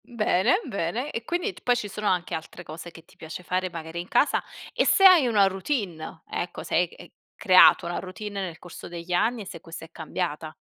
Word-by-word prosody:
Mhmm, 245 Hz, -1 st, -15 dB
bene, 210 Hz, -, +3 dB
bene. 235 Hz, -, -3 dB
E 230 Hz, -, -4 dB
quindi, 355 Hz, -, -2 dB
t -, -, -16 dB
poi 245 Hz, -, +2 dB
ci 215 Hz, -, -3 dB
sono 210 Hz, +1 st, -4 dB
anche 180 Hz, -2 st, 0 dB
altre 165 Hz, +2 st, -6 dB
cose 165 Hz, +2 st, -9 dB
che 165 Hz, -, -15 dB
ti -, -, -22 dB
piace 160 Hz, +2 st, -8 dB
fare, 185 Hz, +1 st, -1 dB
magari 165 Hz, -1 st, -7 dB
in 175 Hz, -, -6 dB
casa 290 Hz, -, +2 dB, 0.3 s
e -, -, +2 dB
se 390 Hz, -, +4 dB
hai 355 Hz, -8 st, +8 dB
una 210 Hz, -4 st, +4 dB
routine, 190 Hz, -, -4 dB
ecco, 175 Hz, -, -4 dB
se -, -, -3 dB
hai 175 Hz, -, +5 dB
ec 175 Hz, -, -7 dB
e 175 Hz, -, -13 dB, 0.2 s
creato 185 Hz, -5 st, +6 dB
una 175 Hz, -, -3 dB
routine 200 Hz, +2 st, -6 dB
nel 175 Hz, -3 st, -6 dB
corso 175 Hz, -, -10 dB
degli 170 Hz, +1 st, -6 dB
anni 225 Hz, +6 st, +1 dB
e -, -, -8 dB
se 185 Hz, -4 st, -8 dB
questa 165 Hz, -2 st, -9 dB
è 165 Hz, -, -19 dB
cambiata. 160 Hz, -1 st, -4 dB
185 Hz, 230 wpm, -25 LUFS, 170-220 Hz, 0.3 s, hai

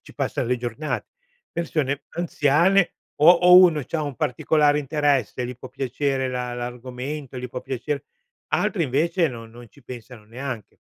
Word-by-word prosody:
ci -, -, -16 dB
passa -, -, -2 dB
le 125 Hz, +2 st, 0 dB
giornate. 120 Hz, +5 st, -4 dB, 0.4 s
Persone 145 Hz, -4 st, -2 dB
anziane 170 Hz, +3 st, +2 dB, 0.2 s
o 150 Hz, -, +5 dB
o 180 Hz, +1 st, +8 dB
uno 175 Hz, -5 st, +6 dB
c'ha 160 Hz, +3 st, -3 dB
un 145 Hz, -2 st, -4 dB
particolare 145 Hz, +4 st, +2 dB
interesse, 140 Hz, -4 st, 0 dB
gli 125 Hz, 0 st, -6 dB
può 130 Hz, -, -10 dB
piacere 135 Hz, +1 st, -2 dB
la 125 Hz, -1 st, -3 dB
l'argomento, 125 Hz, +3 st, -6 dB
gli 125 Hz, 0 st, -5 dB
può 125 Hz, -, -6 dB
piacer 140 Hz, +3 st, -3 dB, 0.5 s
altri, 175 Hz, -6 st, +1 dB
invece, 165 Hz, +6 st, +1 dB
no 120 Hz, -5 st, -6 dB
non 120 Hz, +1 st, -14 dB
ci 140 Hz, -, -21 dB
pensano 120 Hz, -2 st, -10 dB
neanche. 120 Hz, 0 st, -6 dB
135 Hz, 155 wpm, -23 LUFS, 125-155 Hz, 0.5 s, o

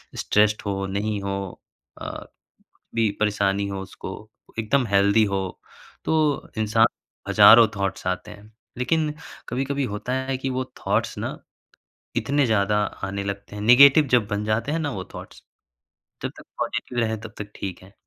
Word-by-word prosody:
Stressed 105 Hz, 0 st, +2 dB
हो, 95 Hz, -1 st, -2 dB
नहीं 100 Hz, +1 st, -2 dB
हो 100 Hz, -1 st, -4 dB, 0.4 s
अ, -, -, -6 dB, 0.7 s
भी 115 Hz, -2 st, +2 dB
परेशानी 100 Hz, -1 st, +1 dB
हो 100 Hz, -1 st, -4 dB
उसको 95 Hz, 0 st, -8 dB, 0.5 s
एकदम 120 Hz, +4 st, +1 dB
हेल्दी 100 Hz, +1 st, +4 dB
हो 95 Hz, -, +1 dB, 0.6 s
तो 155 Hz, -3 st, +1 dB
इंसान 110 Hz, +1 st, +4 dB, 0.4 s
हज़ारों 115 Hz, +1 st, +8 dB
थॉट्स 100 Hz, -2 st, -3 dB
आते 90 Hz, +3 st, -2 dB
हैं। 105 Hz, +1 st, -15 dB, 0.3 s
लेकिन 150 Hz, +4 st, +1 dB, 0.4 s
कभी-कभी 135 Hz, +3 st, -1 dB
होता 105 Hz, +4 st, -4 dB
है 130 Hz, 0 st, -1 dB
कि 130 Hz, 0 st, -3 dB
वो 130 Hz, 0 st, -1 dB
थॉट्स -, -, -1 dB
ना -, -, -4 dB, 0.8 s
इतने 145 Hz, 0 st, +2 dB
ज़्यादा 105 Hz, -2 st, +2 dB, 0.3 s
आने 100 Hz, +1 st, -3 dB
लगते 100 Hz, +1 st, -6 dB
हैं। 105 Hz, -, -5 dB
नेगेटिव 140 Hz, +6 st, +8 dB
जब 120 Hz, -4 st, +4 dB
बन 105 Hz, 0 st, -2 dB
जाते 110 Hz, +6 st, 0 dB
हैं 165 Hz, -, 0 dB
ना 150 Hz, -3 st, -2 dB
वो 95 Hz, -6 st, -4 dB
थॉट्स -, -, -10 dB, 0.8 s
जब -, -, -1 dB
तक -, -, -11 dB, 0.2 s
पॉजिटिव 120 Hz, -, -2 dB
रहें 110 Hz, -2 st, 0 dB
तब 115 Hz, -1 st, -9 dB
तक 105 Hz, 0 st, -7 dB
ठीक 95 Hz, -3 st, -6 dB
हैं 95 Hz, +1 st, -17 dB
110 Hz, 155 wpm, -24 LUFS, 100-125 Hz, 0.8 s, हज़ारों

